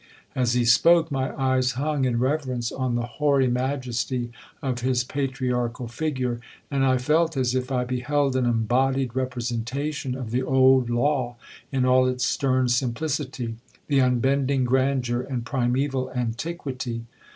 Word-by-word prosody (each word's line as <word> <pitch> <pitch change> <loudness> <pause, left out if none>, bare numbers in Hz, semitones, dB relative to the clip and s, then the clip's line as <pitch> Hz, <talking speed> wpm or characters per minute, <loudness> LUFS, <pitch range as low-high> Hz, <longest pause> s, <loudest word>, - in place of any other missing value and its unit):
(As 125 -2 +1
he 125 -1 +2
spoke, 165 +7 +5
my 135 -1 -1
eyes 130 -1 +2
hung 145 +1 0
in 120 -2 +1
reverence 130 -2 -1
on 130 -2 -1
the 120 0 -1
hoary 140 +1 +2
majesty 125 -1 -2 0.3
of 130 -4 -2
his 125 0 +1
patriarchal 125 -3 -2
figure, 125 -2 -2 0.3
and 135 -1 +1
I 130 -1 +3
felt 155 +4 +1
as 125 -2 +1
if 130 +1 -2
I 125 -1 +1
beheld 130 +2 0
an 130 -2 +2
embodied 125 +2 +1
representation 130 +2 -2
of 125 -4 -6
the 125 +2 +1
old 130 -1 +4
law 120 0 0 0.4
in 130 -2 +1
all 130 0 +4
its 125 0 0
stern 130 -2 +1
simplicity—the 125 0 -2
unbending 130 +2 +2
grandeur, 130 -1 +1
and 125 -2 -4
primeval 130 +1 0
antiquity.) 125 -1 -3
130 Hz, 140 wpm, -25 LUFS, 120-135 Hz, 0.4 s, spoke